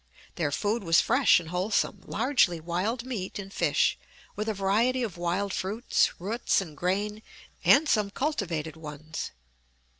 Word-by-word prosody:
Their 155 -4 -1
food 210 +8 -1
was 165 -1 +5
fresh 255 -4 +4
and 165 -2 -9
wholesome, 185 +4 0
largely 225 - +2
wild 185 +9 -2
meat 220 -8 -4
and 195 -1 -7
fish, - - +2 0.4
with 215 +1 -2
a - - 0
variety 225 +7 +2
of 215 -7 -4
wild 180 +3 -1
fruits, 210 +6 0
roots, 215 +7 0
and 165 -6 -6
grain, 205 +6 -1 0.4
and 300 +3 +6
some 210 -7 +2
cultivated 180 - -2
ones. 155 0 -6
200 Hz, 145 wpm, -28 LUFS, 170-225 Hz, 0.4 s, and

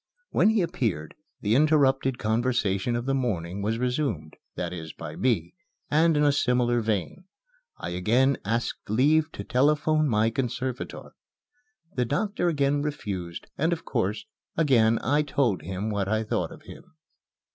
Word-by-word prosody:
When - - +4
he 220 -4 +2
appeared, 115 - -2 0.3
the 105 +1 +1
interrupted 135 -2 +3
conversation 115 -2 0
of 120 0 -2
the 135 - 0
morning 100 -8 -2
was 110 +3 0
resumed 125 - -2 0.2
that - - -3
is, 80 -3 -7
by 80 -2 -8
me 115 -10 0 0.4
and 160 +1 +4
in 150 - +3
a 145 - +5
similar 125 -3 +2
vein. 110 - -2 0.5
I - - -5
again 120 +10 +2
asked 115 +1 -2
leave 150 +8 +3
to - - -6
telephone 150 +3 +2
my 110 0 +2
conservator. 125 +1 -4 0.8
The 125 - 0
doctor 175 - -1
again 145 -3 +1
refused, 100 - -4
and, 160 +4 +2
of 165 -1 -3
course, 110 - -1 0.3
again 115 -8 +4
I 145 +5 +3
told 130 - 0
him 95 +6 -4
what 100 -2 -1
I 110 +2 +1
thought 110 - -2
of - - -12
him. - - -13
125 Hz, 150 wpm, -26 LUFS, 105-145 Hz, 0.8 s, a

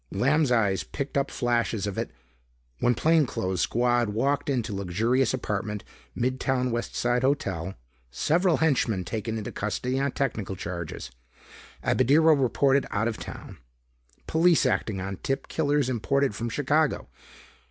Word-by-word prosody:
Lamb's 140 +7 +2
eyes 105 -5 +2
picked 140 0 -5
up 140 0 +1
flashes 120 -4 0
of 100 -2 -3
it. - - -2 0.4
"... - - -40
when 120 - +2
plainclothes 130 - +1
squad 120 -1 +2
walked 140 +8 0
into 120 -5 -1
luxurious 110 +7 +1
apartment... 105 -4 -3 0.3
mid 130 +2 -1
town 130 -1 0
West 120 0 -3
Side 120 +1 +1
hotel... 95 - -1 0.3
several 165 - +2
henchmen 120 - +1
taken 110 +3 -3
into 105 - -5
custody 125 +5 -2
on 140 0 0
technical 110 -8 -2
charges... 85 -7 -6 0.7
Abadirro 160 +5 +4
reported 135 0 +2
out 110 +3 0
of 115 -1 -2
town... - - -9 0.7
police 165 +1 +3
acting 100 -4 0
on 95 0 -4
tip 135 +7 -3
killers 145 -3 +1
imported 130 +1 +1
from 115 +3 -3
Chicago 145 +4 +1
120 Hz, 140 wpm, -26 LUFS, 105-140 Hz, 0.7 s, Abadirro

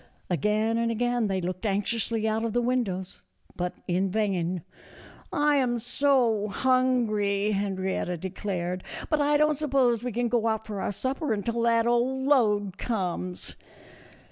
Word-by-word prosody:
Again 215 +7 +1
and 230 0 +1
again 240 0 0
they 190 -1 -1
looked 180 +1 -4
anxiously 220 +2 0
out 220 +1 0
of 230 -2 -2
the 245 - +2
windows, 210 -7 -2 0.3
but 180 0 -3
in 185 +2 +1
vain. 185 -4 -1 0.4
" - - -21
I 295 0 +3
am 245 -3 +1
so 240 -3 +2
hungry," 215 -4 +1
Henrietta 190 -3 -1
declared; 185 0 -3
" - - -9
but 305 -1 +3
I 295 +1 +3
don't 300 -1 +2
suppose 260 -6 +2
we 250 - -2
can 240 +2 0
go 230 -1 +1
out 220 -1 -1
for 205 -3 -5
our - - -1
supper 260 - -2
until 230 +3 -2
that 230 -1 +3
old 250 +3 +1
load 210 -8 +2
comes." 185 -5 -3
220 Hz, 155 wpm, -27 LUFS, 195-245 Hz, 0.4 s, I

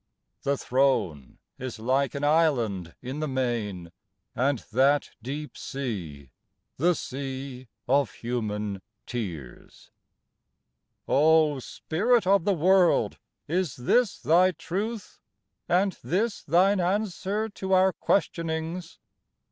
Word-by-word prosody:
The 140 0 0
throne 125 - 0 0.2
is 130 -2 -5
like 130 +5 0
an 140 - -3
island 120 - +1
in 130 +4 -5
the 155 - -1
main, 115 - -2 0.4
And 135 +3 +2
that 135 +5 +3
deep 145 +5 -6
sea 85 - -5 0.5
the 175 +5 +3
sea 130 -2 -6 0.2
of 140 0 +3
human 105 -4 -3 0.2
tears. 85 - -7 1.2
O 155 -1 +4
Spirit 210 - 0
of 195 -2 +3
the 200 - +3
world, 180 +2 +3 0.3
is 170 -2 -1
this 205 - +2
thy 175 +7 +4
truth, 200 +7 -5 0.5
And 190 +3 +3
this 205 +5 0
thine 185 +5 +3
answer 205 +3 -1
to 190 -2 -3
our 185 0 +5
questionings? 165 0 -1
145 Hz, 105 wpm, -27 LUFS, 125-180 Hz, 1.2 s, our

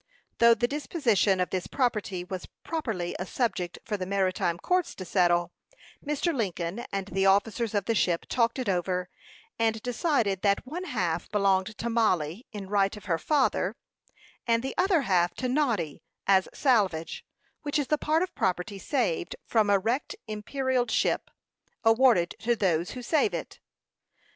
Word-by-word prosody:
Though 235 0 +7
the 240 - +1
disposition 240 - +1
of 180 - 0
this 185 -1 -2
property 210 -8 -1
was 180 0 -6 0.2
properly 225 - -3
a 180 - -2
subject 185 -8 -2
for 215 -2 -2
the 185 -1 -4
maritime 185 -3 0
courts 360 - 0
to 185 - -7
settle, 175 -1 +2 0.5
Mr. 300 +3 0
Lincoln 195 - -3
and 195 0 -3
the 195 +1 +1
officers 210 +3 +2
of 200 -2 +1
the 230 - +1
ship 175 -5 +1
talked 230 -1 +1
it 255 -3 -3
over, 180 -1 -1 0.5
and 225 -1 +1
decided 240 - 0
that 200 +2 +2
one 340 +8 -5
half 175 - -2
belonged 200 0 +1
to 235 - -3
Mollie, 210 - 0
in 205 -4 -7
right 200 +1 +1
of 205 - -12
her 165 -4 0
father, 290 - +1 0.7
and 230 0 +2
the 265 - -3
other 365 -3 +3
half 175 -5 +2
to 255 - -2
Noddy, 235 - 0 0.2
as 190 -1 +4
salvage, 195 - +1 0.4
which 290 +1 -1
is 290 - +1
the 300 +2 0
part 315 +3 +2
of 370 - -5
property 190 +2 -1
saved 215 - -1
from 220 -3 +2
a 200 - +5
wrecked 240 - -1
imperilled 250 +4 -1
ship, - - +1 0.5
awarded 225 -6 +4
to 240 +1 +1
those 175 -5 +1
who 250 - -6
save 335 - +2
it. - - -6
210 Hz, 165 wpm, -28 LUFS, 185-250 Hz, 0.7 s, Though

